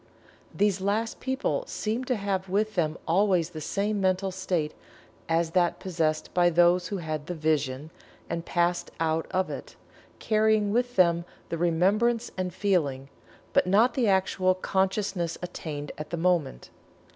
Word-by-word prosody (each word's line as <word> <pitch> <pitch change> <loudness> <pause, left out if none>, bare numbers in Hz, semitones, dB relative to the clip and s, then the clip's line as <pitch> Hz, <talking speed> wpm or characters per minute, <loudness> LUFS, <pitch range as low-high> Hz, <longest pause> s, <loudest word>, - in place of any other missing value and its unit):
These 200 -2 +1
last 215 +4 -1
people 265 - -1
seem 225 +4 -2
to 255 - 0
have 195 -2 -2
with 215 +3 0
them 160 -3 0
always 180 -1 +2
the 155 -3 -7
same 200 +5 -1
mental 190 0 +1
state 180 -4 -2 0.6
as 165 0 +1
that 175 -1 +2
possessed 160 -4 -1
by 175 -1 +4
those 175 +1 +4
who 200 - -3
had 155 -4 -4
the 180 - -3
"vision" 155 -2 -1 0.4
and 170 0 -3
passed 175 0 0
out 160 0 0
of 185 0 0
it, - - -8 0.4
carrying 215 -1 +2
with 245 +2 0
them 170 -2 +4 0.3
the 165 - -2
remembrance 205 +8 +2
and 185 -1 -2
feeling, 155 -9 0 0.4
but - - +3
not 220 +6 +4
the 245 -3 +1
actual 190 -1 +2
consciousness 190 -2 -1
attained 150 -4 -5
at 150 - -6
the 170 - -3
moment. 165 - 0
180 Hz, 150 wpm, -27 LUFS, 165-200 Hz, 0.6 s, by